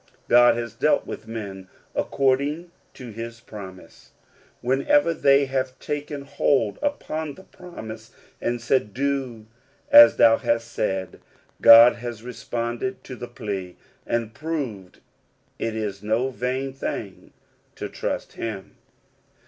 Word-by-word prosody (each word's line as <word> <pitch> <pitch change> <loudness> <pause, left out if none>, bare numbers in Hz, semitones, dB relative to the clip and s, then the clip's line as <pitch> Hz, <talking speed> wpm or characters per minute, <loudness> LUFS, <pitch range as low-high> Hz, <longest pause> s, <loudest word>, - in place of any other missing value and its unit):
God 120 0 +6
has 115 -2 -4
dealt 150 +6 +1
with - - -8
men 100 -4 -7 0.3
according 140 +6 0 0.2
to 125 -3 -9
his 115 +2 -7
promise. 100 -6 -12 0.5
Whenever 140 +5 +2
they 140 -2 +4
have 130 -1 -2
taken 145 -1 -5
hold 135 -5 0
upon 160 - -3
the 190 - -14
promise, 110 -14 -10 0.3
and 120 0 -1
said, 115 -3 0
"Do 135 -5 -2 0.5
as 290 0 +10
thou 115 0 +6
hast 115 0 -1
said," 95 -3 -3 0.4
God 115 +2 +9
has 120 -2 -7
responded 120 +8 -4
to 130 - -8
the 120 0 -7
plea, 100 -7 -6 0.3
and 115 -1 -1
proved 135 - -5 0.6
that - - -2
it 110 - -4
is 105 -3 -4
no 110 +5 0
vain 130 +2 -3
thing 105 -7 -6 0.4
to - - -5
trust - - -4
him. 105 -4 -6
120 Hz, 125 wpm, -24 LUFS, 110-140 Hz, 0.6 s, as